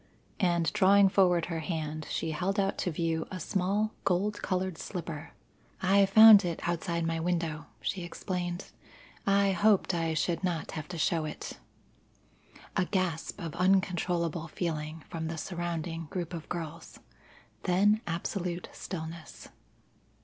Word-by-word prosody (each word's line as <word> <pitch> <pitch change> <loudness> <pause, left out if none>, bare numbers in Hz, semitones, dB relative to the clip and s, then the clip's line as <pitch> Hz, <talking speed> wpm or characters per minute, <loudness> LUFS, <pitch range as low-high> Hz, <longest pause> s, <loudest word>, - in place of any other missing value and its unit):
And 170 -4 +2
drawing 200 -1 +6
forward 180 -4 +3
her 165 -1 -3
hand, 155 -2 -4
she 160 - -2
held 185 +6 -1
out 195 0 0
to 180 - 0
view 160 0 -1
a 185 - -5
small 200 +5 0
gold 200 +3 0
coloured 185 -3 -2
slipper. 170 -4 -6 0.5
"I 195 +1 +4
found 215 0 +9
it 170 -2 -3
outside 170 0 -1
my 165 0 -1
window," 165 -2 -2
she 190 - -2
explained. 175 +1 -4 0.6
"I 200 0 +4
hoped 195 +1 +3
I 165 -2 0
should 170 +3 0
not 175 -3 -1
have 155 -1 -5
to 180 - -6
show 160 0 +1
it." 155 - -7 1.2
A 190 - +2
gasp 185 -2 -2
of 165 -5 -5
uncontrollable 175 -3 +1
feeling 155 -1 -4
from 160 -1 -4
the 165 0 -4
surrounding 170 -1 -3
group 175 0 -4
of 165 -2 -7
girls, 165 -1 -6 0.7
then 205 +4 +4
absolute 175 +1 -3
stillness. 165 -2 -7
175 Hz, 135 wpm, -30 LUFS, 165-190 Hz, 1.2 s, found